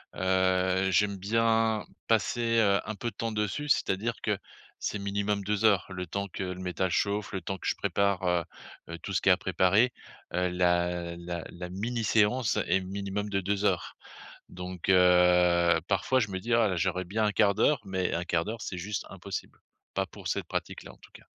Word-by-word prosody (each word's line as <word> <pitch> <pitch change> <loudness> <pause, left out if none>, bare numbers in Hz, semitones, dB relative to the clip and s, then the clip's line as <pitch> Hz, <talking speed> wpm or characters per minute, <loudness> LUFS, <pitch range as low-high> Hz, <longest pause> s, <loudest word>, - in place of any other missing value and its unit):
heu, 95 0 +2
j'aime 100 +1 +2
bien 110 +2 +2 0.2
passer, 115 +2 +1
heu, 100 -2 +4
un 110 +1 -4
peu 120 +3 -3
de - - -16
temps 115 -1 -2
dessus, 105 +8 -2
c'est-à-dire 115 -3 +1
que 105 -2 0 0.5
c'est 105 - -2
minimum 100 0 -1
2 105 +2 0
heures, 100 -3 +4
le 90 -1 -5
temps 100 +4 -3
que 95 - -5
le 90 -1 -4
métal 95 0 -1
chauffe, 100 +2 0
le 95 - -3
temps 95 +3 -4
que - - -6
je - - +1
prépare, 100 -2 0
heu, 90 -1 +2 0.5
heu, - - -5
tout - - -6
ce - - +1
qui - - +3
est - - +8
à - - +5
préparer, 105 +7 +3 0.4
heu, 90 +1 +1
la 90 -1 0
la 85 -1 -5
la 90 0 -7
mini 115 +6 -3
séance 110 +2 +2
est 95 - +2
minimum 100 +2 -4
de 100 -1 0
2 100 +2 -1
heures. 90 -3 0 0.5
Donc, 90 0 -6
heu, 90 -2 +5
parfois, 100 +7 +2
je 110 -4 0
me 95 -1 -3
dis 115 +5 -2
«Ah, 110 -5 +3
j'aurais 95 +2 0
bien 110 +4 0
1/4 105 0 +3
d'heure», 145 +7 +3
mais 95 -1 -1
1/4 85 -1 0
d'heure 110 +1 -5
c'est 90 - -5
juste 100 +3 -4
impossible, 95 0 -7 0.4
pas - - +1
pour - - -9
cette - - -1
pratique - - -4
là, - - -10
en - - -20
tout - - -19
cas. - - -14
95 Hz, 200 wpm, -29 LUFS, 90-105 Hz, 0.5 s, est